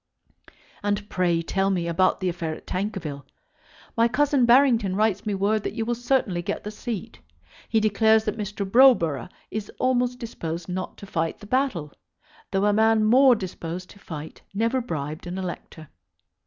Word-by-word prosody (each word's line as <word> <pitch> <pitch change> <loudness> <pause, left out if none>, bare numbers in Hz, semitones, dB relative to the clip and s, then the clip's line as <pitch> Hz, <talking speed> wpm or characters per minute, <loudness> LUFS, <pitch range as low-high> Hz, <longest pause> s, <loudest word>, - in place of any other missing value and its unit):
And 205 0 -1
pray 175 -2 +1
tell 195 +3 0
me 175 -3 0
about 175 +2 +2
the 185 - +1
affair 165 -2 -3
at - - -14
Tankerville. 180 -8 -4 0.7
My 230 0 +4
cousin 280 0 +2
Barrington 235 -6 +4
writes 215 0 +1
me 205 - 0
word 205 +3 +1
that - - -4
you 225 -2 -2
will 240 - 0
certainly 240 -7 0
get - - -4
the 210 - -5
seat. 215 -2 -6 0.5
He 225 - +3
declares 220 +1 +3
that 215 - -1
Mr. 205 -2 -4
Browborough 190 - +4 0.2
is 215 -1 -4
almost 250 -1 +1
disposed 170 -8 -5
not 185 0 -4
to - - -10
fight 165 -4 -2
the - - -13
battle, 210 - -1 0.6
though 195 +1 +1
a 210 - +3
man 220 +1 +4
more 255 +3 +6
disposed 180 -3 -6
to 200 - -16
fight 160 -5 -8
never 230 +5 +1
bribed 155 -5 -5
an 180 +2 -4
elector. 175 -3 -7
205 Hz, 170 wpm, -25 LUFS, 175-230 Hz, 0.7 s, more